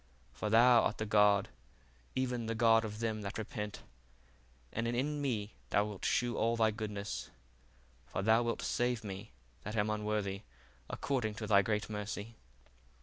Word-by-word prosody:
For 105 - -3
thou 120 +2 +7
art - - 0
the 110 - -2
God, 105 -1 +4 0.7
even 125 -3 -1
the 115 - -1
God 115 0 +5
of 105 0 -5
them 110 -2 -1
that 100 +1 -5
repent; 105 -1 -5 0.9
and 115 +1 -1
in 140 +5 -1
me 110 -7 -2 0.2
thou 105 - +3
wilt 105 -3 -6
shew 120 -2 +1
all 115 +1 +2
thy 110 -1 +3
goodness: 105 -2 -4 0.8
for 95 - -3
thou 110 +3 +5
wilt 115 -1 -1
save 120 -2 0
me, 100 +1 -6 0.3
that 105 +2 -5
am 105 0 +1
unworthy, 105 -2 -1 0.5
according 120 -6 -1
to 110 - -4
thy 100 -1 +5
great 105 +1 -1
mercy. 105 +1 -5
110 Hz, 155 wpm, -34 LUFS, 105-115 Hz, 0.9 s, thou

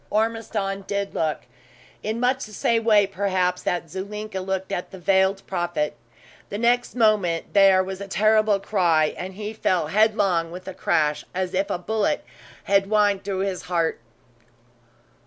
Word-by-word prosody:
Ormiston 215 -3 -1
did 200 -1 -2
look 155 -2 -1 0.6
in 220 +2 -3
much 255 +2 +1
the 215 - -13
same 230 +2 +1
way, 210 -3 +5
perhaps, 185 -2 -1
that 175 -1 -2
Zulinka 200 +3 -5
looked 190 +1 -3
at 180 -2 -3
the 190 - -10
Veiled 190 +1 +2
Prophet. 175 -5 -2 0.5
The 205 - -4
next 240 +2 +1
moment 210 -8 +1
there 195 -2 +6
was 190 +1 -6
a 200 - -6
terrible 215 0 +3
cry, 170 -7 +2
and 185 +1 -7
he 210 +1 -5
fell 180 -7 0
headlong 200 -4 +2
with 180 +2 -9
a 190 - -5
crash, 150 -4 0
as 185 -1 -2
if 195 +2 0
a 200 - -1
bullet 210 +4 -1 0.4
had 200 0 +3
whined 205 -1 +2
through 190 -1 -2
his 195 -2 -2
heart. 170 -1 -1
195 Hz, 155 wpm, -24 LUFS, 180-210 Hz, 0.6 s, there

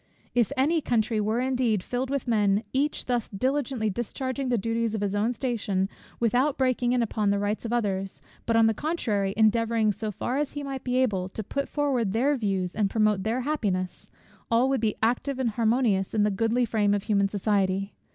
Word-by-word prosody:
If 240 0 +2
any 310 +5 +2
country 225 -4 +1
were 215 +3 0
indeed 250 -6 +1
filled 255 +1 -2
with 275 -2 -2
men, 210 -2 +2
each 285 +3 0
thus 245 -3 -1
diligently 255 +1 -1
discharging 260 +5 -3
the 245 - +2
duties 230 +1 -1
of 210 - -3
his 200 -1 -1
own 210 +3 +1
station 215 -6 -1 0.3
without 250 +5 +2
breaking 250 -2 +1
in 245 -1 +2
upon 210 -2 0
the 200 - +2
rights 205 +3 -2
of 230 - -3
others, 195 -5 -1 0.3
but 230 - +2
on 225 0 +6
the 225 - +3
contrary 215 - -1
endeavouring, 225 0 +3
so 215 +2 -4
far 240 +6 -2
as 295 -1 -2
he 290 - -5
might 270 -2 -5
be 250 0 -1
able, 195 -8 +1
to 220 - -6 0.2
forward 260 -9 0
their 270 +6 +2
views 195 -6 -1
and 205 -2 +1
promote 215 -2 +2
their 225 +5 -1
happiness; 205 -11 -2 0.4
all 235 +3 +3
would 270 -4 +1
be 220 -2 +1
active 250 +4 +1
and 255 -3 0
harmonious 220 -4 +1
in 210 - +3
the 210 - +2
goodly 225 +5 +1
frame 210 -3 +2
of 200 - -2
human 200 -3 +2
society. 195 -1 0
225 Hz, 195 wpm, -26 LUFS, 205-255 Hz, 0.4 s, on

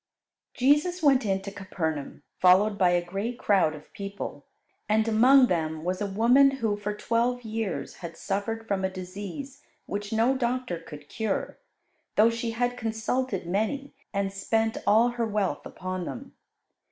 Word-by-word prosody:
Jesus 300 +7 +2
went 270 -6 +4
into 195 0 -1
Capernaum, 160 -8 -4 0.2
followed 190 +4 +5
by 185 -3 +3
a 175 0 +1
great 200 +7 -3
crowd 190 -9 +2
of 150 0 -14
people, 200 0 -6 0.4
and 220 +1 +3
among 250 +5 +6
them 160 -6 -1
was 185 +2 -2
a 205 - 0
woman 235 +8 +5
who 230 -6 -1
for 205 0 -4
twelve 235 +3 0
years 220 -2 -4
had 165 -2 -8
suffered 225 +5 -3
from 195 -2 -1
a 190 - +1
disease 200 +9 -7 0.2
which 205 0 -4
no 230 +4 +3
doctor 250 -7 -1
could 150 -3 -11
cure, 220 +2 -3 0.6
though 225 +2 +5
she 230 0 -3
had 245 +2 -1
consulted 220 -2 -2
many, 220 +10 -2 0.2
and 195 -1 -1
spent 225 +3 0
all 225 +4 +5
her 240 -1 -2
wealth 205 -3 -1
upon 185 -1 -5
them. 265 +9 -7
210 Hz, 155 wpm, -27 LUFS, 190-240 Hz, 0.6 s, among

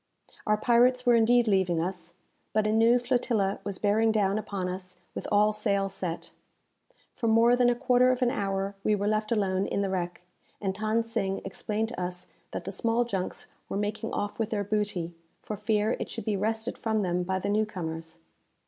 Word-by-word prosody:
Our 210 0 +3
pirates 245 +3 +3
were 245 - +6
indeed 235 +1 +4
leaving 190 -4 +2
us, 175 0 -4 0.4
but 215 -1 +2
a 215 - +2
new 225 +2 +5
flotilla 240 -5 0
was 200 -2 -4
bearing 215 +3 +3
down 205 -1 +1
upon 195 -3 -3
us 185 0 -6 0.2
with - - -5
all 210 +1 +4
sail 200 -2 0
set! 180 -3 -4 0.8
For 230 - -2
more 230 +2 +5
than 245 -1 +4
a 240 - +2
quarter 250 0 +4
of 255 0 0
an 245 - +3
hour 195 -1 -1
we 215 - +3
were 205 0 -2
left 215 +1 0
alone 195 -3 +1
in 200 - -1
the 195 - -1
wreck, 175 -2 -3 0.4
and 190 -2 -2
Than 215 +2 +1
Sing 195 -4 -1
explained 215 +3 -2
to 240 -6 -5
us 180 0 -4 0.2
that - - -5
the 195 - -3
small 230 +4 +1
junks 195 -5 -3 0.2
were - - -2
making 210 +2 -2
off 205 +2 -3
with 225 -1 0
their 210 -3 -1
booty, 200 -5 -2 0.3
for 215 - -5
fear 210 +1 +1
it - - -4
should 225 - -6
be 215 -2 0
wrested 220 +4 -2
from 220 -1 0
them 180 -2 0
by 190 +1 -1
the 190 - -3
new 215 +1 +2
comers. 165 -4 -6
210 Hz, 200 wpm, -28 LUFS, 190-225 Hz, 0.8 s, were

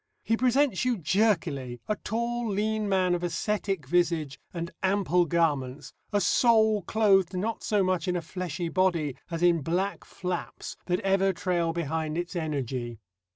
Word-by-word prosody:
He 225 - +2
presents 255 -2 +2
you 250 -2 +1
jerkily 155 - 0
a 215 - +1
tall 235 +2 -2
lean 210 +1 0
man 185 -2 +2
of 175 - -1
ascetic 185 0 -2
visage 165 -2 0
and 170 -1 -5
ample 190 -2 +2
garments, 145 -5 -1 0.2
a 205 - +2
soul 220 +1 +4
clothed 195 -2 +3
not 220 +4 -2
so 205 -2 +1
much 185 0 0
in 180 - +1
a 175 - -1
fleshy 175 -1 -4
body 165 -6 +1
as 165 0 -3
in 170 -2 +4
black 180 +7 -1
flaps 180 -2 -5
that 180 +2 0
ever 195 -1 +2
trail 170 -1 0
behind 160 -1 -2
its 175 +1 -4
energy. 130 -7 -3
180 Hz, 155 wpm, -27 LUFS, 165-205 Hz, 0.2 s, soul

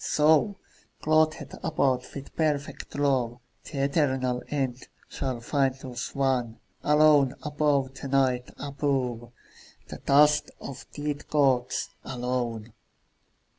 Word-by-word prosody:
So, 160 +7 +3 0.5
clothed 155 0 +1
about 135 -6 0
with 140 -1 -8
perfect 150 -3 -2
love, 130 -4 +1 0.3
The 135 -3 -3
eternal 130 -4 +1
end 130 -4 -2 0.2
shall 130 -3 -4
find 135 +1 +1
us 125 -2 -6
one, 130 -4 0 0.2
Alone 150 -3 +5
above 145 -3 +1
the 140 - -7
Night, 130 -2 +1
above 135 -4 -2 0.6
The - - -6
dust 150 +2 +4
of 135 - -8
the 145 - -7
dead 145 - -15
gods, 135 -5 +1
alone. 120 -3 -3
135 Hz, 110 wpm, -27 LUFS, 125-145 Hz, 0.6 s, Alone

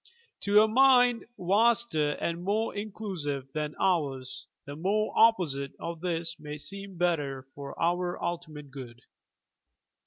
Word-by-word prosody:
To 205 +1 +5
a - - +3
mind 245 0 +5
vaster 200 -5 +2
and 170 +1 -2
more 215 +4 0
inclusive 185 -10 -4
than 150 -1 -3
ours 140 -8 -1 0.2
the 140 - -7
very 200 +7 0
opposite 165 -12 +3
of 170 -1 -5
this 170 -1 -2
may 150 0 -7
seem 195 +4 -7
better 145 -7 0
for 140 +1 -10
our 175 +1 0
ultimate 155 -5 -5
good. 125 -3 -10
170 Hz, 125 wpm, -29 LUFS, 145-205 Hz, 0.2 s, To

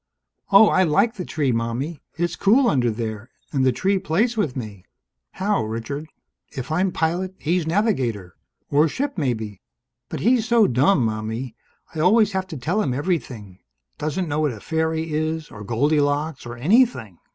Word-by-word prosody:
"Oh, 200 +2 +8
I 185 - +3
like 195 +7 +3
the 185 -6 -6
tree, 145 -4 0
Mommie. 120 +7 -2 0.2
It's 175 0 -1
cool 240 +6 +4
under 125 - +2
there. 110 0 -5 0.2
And 135 -2 +1
the 130 - +4
tree 190 +10 0
plays 215 +10 0
with 160 - -1
me." 105 -6 -7 0.5
"How, 200 - 0
Richard?" 115 +8 -5 0.4
"If 130 +2 -6
I'm 180 +4 +1
pilot, 175 +3 -1
he's 170 +1 -1
navigator. 130 - 0 0.4
Or 150 +3 +4
ship, 280 - -3
maybe. 110 - -3 0.5
But - - -5
he's 235 +1 +3
so 235 -3 +5
dumb, 130 +2 +3
Mommie! 110 +2 -4 0.4
I 160 - -5
always 210 +5 +4
have 190 -1 -2
to 160 -5 -7
tell 165 - 0
him 130 -10 -1
everything. 125 - -3 0.4
Doesn't 155 +4 -2
know 150 0 -1
what 150 -4 +1
a 110 - -9
fairy 160 +3 -2
is, 155 0 -2
or 105 - -9
Goldilocks, 145 +5 0
or 120 0 -7
anything!" 150 - +2
155 Hz, 165 wpm, -22 LUFS, 120-185 Hz, 0.5 s, Oh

